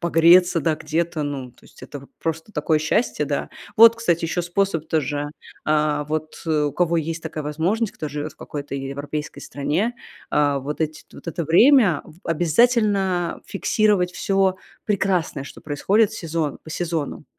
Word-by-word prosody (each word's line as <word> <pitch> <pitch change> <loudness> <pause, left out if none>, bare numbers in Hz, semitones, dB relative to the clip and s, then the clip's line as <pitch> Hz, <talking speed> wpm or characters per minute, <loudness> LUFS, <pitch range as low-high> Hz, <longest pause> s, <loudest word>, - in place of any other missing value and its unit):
погреться, 170 +1 +5
да, 155 +1 +1
где-то. 160 +1 -2
Ну, 135 -4 -5
то - - -32
есть - - -18
это 145 - -8
вот 140 - -16
просто 160 +5 -4
такое 155 -1 +1
счастье, 155 0 0
да. 140 0 -2 0.3
Вот, 230 +1 +9
кстати, 175 -8 0
еще 175 +2 -1
способ 175 -2 -1
тоже. 145 -1 -1 0.3
А, 150 -1 +1
вот 155 +1 -4
у 150 -2 +1
кого 170 +1 +1
есть 165 +1 -2
такая 155 -2 -5
возможность, 180 +9 -1
кто 155 - -5
живет 150 +1 -5
в - - -31
какой-то 145 -1 -6
е 135 0 -4
европейской 145 +2 -5
стране, 170 +12 -1 0.4
а, 145 -1 +2
вот 145 +4 -5
эти 155 -1 -2
вот - - -10
это 170 0 -3
время 195 - +5
в 160 +1 -16
обязательно 190 0 +2
фиксировать 200 -2 +1
всё 195 -1 +1 0.3
прекрасное, 185 -8 0
что - - -11
происходит 195 +9 +1
сезон 160 -3 -3
по 155 - -10
сезонам. 160 -3 -3
160 Hz, 160 wpm, -22 LUFS, 150-185 Hz, 0.4 s, Вот